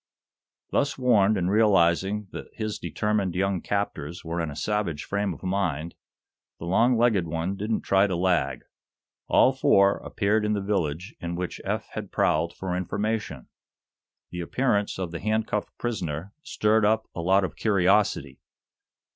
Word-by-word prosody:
Thus 145 0 +1
warned, 110 -5 +3
and 90 0 0
realizing 100 -1 +3
that - - -7
his 110 -1 -3
determined 105 -4 -1
young 95 0 0
captors 85 -6 -3
were 85 +1 -2
in 80 - -2
a 70 - -7
savage 95 -5 -2
frame 100 0 -1
of 85 - -9
mind, 90 -4 -1 0.6
the - - -8
long 115 +8 +3
legged 110 -7 +2
one 85 +4 -2
didn't 105 +3 -2
try 100 +1 +3
to 95 - -2
lag. 85 -6 0 0.6
All 130 - +5
four 105 -8 +4
appeared 105 +1 0
in 105 0 +1
the 105 - 0
village 95 -1 -2
in 85 0 -4
which 90 0 -4
Eph - - -3
had - - -7
prowled 85 0 +1
for 95 -2 -3
information. 100 - -3 0.8
The 90 - -4
appearance 105 +2 0
of 90 -3 -4
the 85 - -5
handcuffed 110 0 -2
prisoner 95 -5 -4
stirred 110 -6 +1
up 110 +1 +2
a 85 - -4
lot 95 +3 +3
of 95 - -3
curiosity. 100 -8 +1
100 Hz, 155 wpm, -26 LUFS, 85-105 Hz, 0.8 s, All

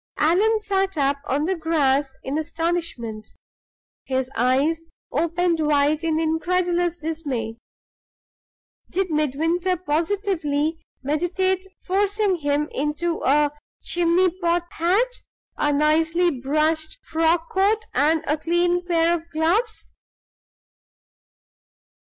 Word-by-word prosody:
Allan 400 +8 +3
sat 390 -3 -1
up 280 0 +2
on 285 +3 0
the 380 +3 0
grass 290 -5 +1
in 270 - -3
astonishment; 315 -9 -3 0.8
his 260 -1 -2
eyes 275 +7 +1 0.3
opened 335 +3 +1
wide 300 +1 +2
in 320 -1 +1
incredulous 345 +2 0
dismay. 285 -9 -4 1.3
Did 375 -1 -1
Midwinter 325 +5 0
positively 325 -2 -1 0.2
meditate 360 +6 0 0.2
forcing 400 0 +1
him 290 -1 0
into 300 +4 -2
a 290 +2 +3 0.3
"chimney 350 +1 +2
pot 345 0 +1
hat," 415 +10 +1 0.3
a 295 - +1
nicely 320 +4 +2
brushed 310 +4 0
frock 325 +1 +1
coat, 420 +4 +2
and 310 +4 +2
a 300 +1 0
clean 350 +2 +1
pair 340 -1 +2
of 335 0 -4
gloves? 370 +9 0
325 Hz, 100 wpm, -23 LUFS, 295-355 Hz, 1.3 s, Allan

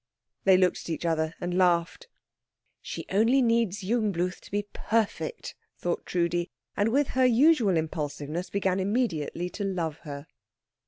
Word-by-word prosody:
They 190 -1 +7
looked 185 -1 +2
at - - -9
each 165 +1 -3
other 160 -1 0
and 175 0 -3
laughed. 180 - +2 0.7
"She - - -6
only 225 +7 +4
needs 230 -5 +1
Jungbluth 190 -4 0
to - - -14
be 205 0 -1
perfect," 230 - -2 0.2
thought 175 -1 -3
Trudi; 175 0 0 0.3
and 205 +2 +2
with 280 +4 +2
her 260 0 +2
usual 245 - +4
impulsiveness 155 +1 -3
began 190 -1 0
immediately 190 - -1
to 205 - -5
love 170 -6 -2
her. 145 -2 -8
185 Hz, 145 wpm, -27 LUFS, 170-225 Hz, 0.7 s, They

